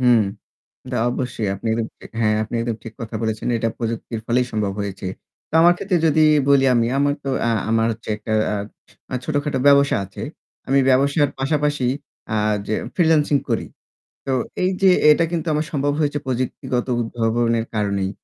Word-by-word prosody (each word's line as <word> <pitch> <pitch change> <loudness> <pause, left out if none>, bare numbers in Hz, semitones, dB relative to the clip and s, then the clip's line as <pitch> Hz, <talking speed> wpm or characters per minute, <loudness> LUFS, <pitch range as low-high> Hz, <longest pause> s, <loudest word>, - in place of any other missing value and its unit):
হুম। 125 -3 +5 0.7
তা 125 - -1
অবশ্যই 125 -3 -3
আপনি 105 +4 -6
একদম 115 -1 -1 0.2
এ - - -11 0.2
হ্যাঁ 105 -1 +3
আপনি 110 - -5
একদম 115 -1 -2
ঠিক 115 - -8
কথা 110 0 -6
বলেছেন। 110 -1 -2
এটা 115 0 0
প্রযুক্তির 115 -1 -4
ফলেই 125 +1 +2
সম্ভব 105 -2 -1
হয়েছে। 100 -1 -5 0.4
তো - - -24
আমার 175 +1 +7
ক্ষেত্রে 185 -2 0
যদি 155 0 +3 0.3
বলি 140 -1 +5
আমি, 115 -1 +2
আমার 145 0 +2
তো 140 - -3
অ্যা 115 - +1 0.2
আমার 115 0 +2
হচ্ছে 115 +1 -8
একটা 110 - -7 0.8
অ্যা - - -3
ছোটখাটো 145 -2 -1
ব্যবসা 140 0 +5
আছে। 100 +2 -10 0.5
আমি 135 +1 +3
ব্যবসার 140 +2 +3
পাশাপাশি 145 0 0 0.4
অ্যা 110 - 0 0.3
যে 110 - 0 0.2
ফ্রিল্যান্সিং 160 -4 +3
করি। - - 0 0.6
তো 135 - 0 0.3
এইযে 190 +1 +3 0.2
এটা 160 +3 +5
কিন্তু 170 -1 -2
আমার 150 +1 0
সম্ভব 145 -1 0
হয়েছে 145 -1 0
প্রযুক্তিগত 125 -1 -2
উদ্ভাবনের 115 0 0
কারণেই। 100 -2 0
125 Hz, 165 wpm, -21 LUFS, 115-145 Hz, 0.8 s, আমার